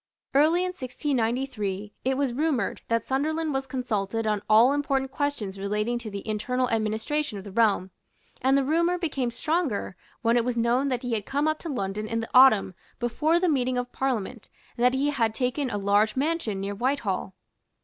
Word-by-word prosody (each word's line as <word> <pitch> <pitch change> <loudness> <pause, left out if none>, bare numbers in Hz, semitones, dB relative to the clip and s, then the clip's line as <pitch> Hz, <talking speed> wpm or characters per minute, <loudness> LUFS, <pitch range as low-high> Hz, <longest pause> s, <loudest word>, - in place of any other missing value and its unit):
Early 310 +5 +4
in 365 - -1
1693, 240 - -2
it 260 +1 0
was 275 -3 0
rumoured 290 -2 -1
that 230 -1 0
Sunderland 310 +3 -1
was 270 0 -2
consulted 225 -4 -2
on 210 -2 0
all 230 +5 +6
important 275 -2 0
questions 250 -11 -3
relating 210 +4 -1
to 230 -2 -7
the 200 +1 -7
internal 250 +4 0
administration 220 +4 -1
of 195 - -7
the 200 - -9
realm; 200 -3 +2 0.5
and 265 +2 +4
the 275 - +2
rumour 340 +5 +2
became 285 -8 -1
stronger 265 - -1 0.3
when 230 +1 +3
it 235 - +3
was 245 0 -2
known 240 +4 +2
that 255 -2 -2
he 245 -1 -2
had 210 -3 -2
come 285 +2 0
up 310 0 0
to 335 - -6
London 210 -4 -3
in 230 +1 -1
the 225 - -5
autumn 250 -7 +6 0.2
before 305 +8 +1
the 365 - +1
meeting 255 -5 +1
of 245 0 -3
Parliament 245 -4 -3 0.3
and 240 - -2
that 250 +1 +4
he 285 +2 +1
had 225 -5 0
taken 255 +2 -1
a 205 - -2
large 205 +2 +2
mansion 275 -8 -1
near 200 +1 -3
Whitehall. 210 -5 -2
245 Hz, 190 wpm, -26 LUFS, 215-280 Hz, 0.5 s, all